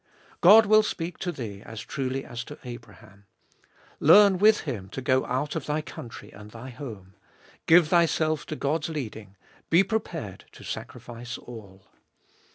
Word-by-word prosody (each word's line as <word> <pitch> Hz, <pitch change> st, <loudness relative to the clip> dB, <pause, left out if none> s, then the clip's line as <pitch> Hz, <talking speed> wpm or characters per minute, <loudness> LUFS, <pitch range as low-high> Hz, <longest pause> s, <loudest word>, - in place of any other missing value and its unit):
God 215 Hz, +5 st, +8 dB
will 215 Hz, +1 st, +6 dB
speak 170 Hz, -5 st, -4 dB
to 180 Hz, -, -2 dB
thee 110 Hz, -, -7 dB
as 110 Hz, 0 st, -9 dB
truly 135 Hz, 0 st, -4 dB
as 120 Hz, 0 st, -6 dB
to -, -, -10 dB
Abraham. 110 Hz, -4 st, -12 dB, 0.7 s
Learn 190 Hz, +4 st, +6 dB
with 210 Hz, +1 st, +5 dB
him 105 Hz, -, -5 dB
to 120 Hz, -, -6 dB
go 130 Hz, 0 st, +1 dB
out 130 Hz, +5 st, -2 dB
of 160 Hz, -, -4 dB
thy 150 Hz, +1 st, -1 dB
country 120 Hz, -6 st, -10 dB
and 105 Hz, +1 st, -12 dB
thy 120 Hz, +4 st, -10 dB
home; 110 Hz, -7 st, -9 dB, 0.5 s
give 165 Hz, -1 st, +6 dB
thyself 160 Hz, -3 st, +2 dB
to 155 Hz, -, -4 dB
God's 155 Hz, +4 st, -1 dB
leading; 110 Hz, -10 st, -6 dB, 0.3 s
be 170 Hz, +4 st, +5 dB
prepared 175 Hz, -, -4 dB
to -, -, -13 dB
sacrifice 120 Hz, 0 st, -7 dB
all. 100 Hz, -5 st, -12 dB
130 Hz, 155 wpm, -26 LUFS, 115-165 Hz, 0.7 s, God